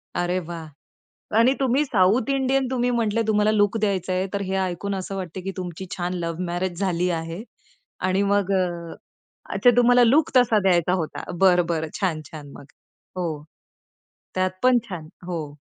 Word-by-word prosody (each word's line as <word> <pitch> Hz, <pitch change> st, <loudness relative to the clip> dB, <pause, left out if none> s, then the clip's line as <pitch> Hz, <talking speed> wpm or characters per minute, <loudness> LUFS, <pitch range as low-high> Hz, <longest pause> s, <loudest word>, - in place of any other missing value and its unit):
अरे 175 Hz, +1 st, 0 dB
वाह! 165 Hz, -2 st, -7 dB, 0.7 s
आणि 245 Hz, +4 st, +5 dB
तुम्ही 270 Hz, +2 st, +2 dB
साउथ 215 Hz, +3 st, +2 dB
इंडियन 270 Hz, -1 st, +1 dB
तुम्ही 245 Hz, -1 st, +1 dB
म्हटले, 230 Hz, -2 st, +1 dB
तुम्हाला 210 Hz, 0 st, +3 dB
लूक 205 Hz, 0 st, +2 dB
द्यायचाय, 190 Hz, -3 st, 0 dB
तर 200 Hz, -, -1 dB
हे 190 Hz, 0 st, -2 dB
ऐकून 190 Hz, +3 st, -3 dB
असं 195 Hz, +1 st, -5 dB
वाटत, 185 Hz, -2 st, -6 dB
की 195 Hz, -, -3 dB
तुमची 180 Hz, 0 st, -5 dB
छान 180 Hz, 0 st, -2 dB
लव्ह 170 Hz, -1 st, -3 dB
मॅरेज 175 Hz, +1 st, -3 dB
झाली 180 Hz, -2 st, 0 dB
आहे. 165 Hz, +4 st, -4 dB, 0.6 s
आणि 185 Hz, +1 st, +1 dB
मग 200 Hz, -1 st, +1 dB
अ 190 Hz, -, +3 dB, 1.0 s
अच्छा 245 Hz, -, +5 dB
तुम्हाला 245 Hz, 0 st, +6 dB
लूक 280 Hz, +6 st, +3 dB
तसा 230 Hz, -4 st, +5 dB
द्यायचा 180 Hz, -2 st, +3 dB
होता? 160 Hz, -4 st, -3 dB, 0.2 s
बरं, 180 Hz, -2 st, +5 dB
बरं, 160 Hz, -2 st, -2 dB
छान, 175 Hz, -5 st, 0 dB
छान! 145 Hz, -3 st, -10 dB
मग. -, -, -12 dB, 0.5 s
हो. 160 Hz, -5 st, -3 dB, 0.9 s
त्यात 185 Hz, 0 st, +1 dB
पण 255 Hz, -1 st, +5 dB
छान. 165 Hz, -5 st, -7 dB, 0.2 s
हो. 155 Hz, -5 st, -5 dB
185 Hz, 160 wpm, -23 LUFS, 175-220 Hz, 1.0 s, तुम्हाला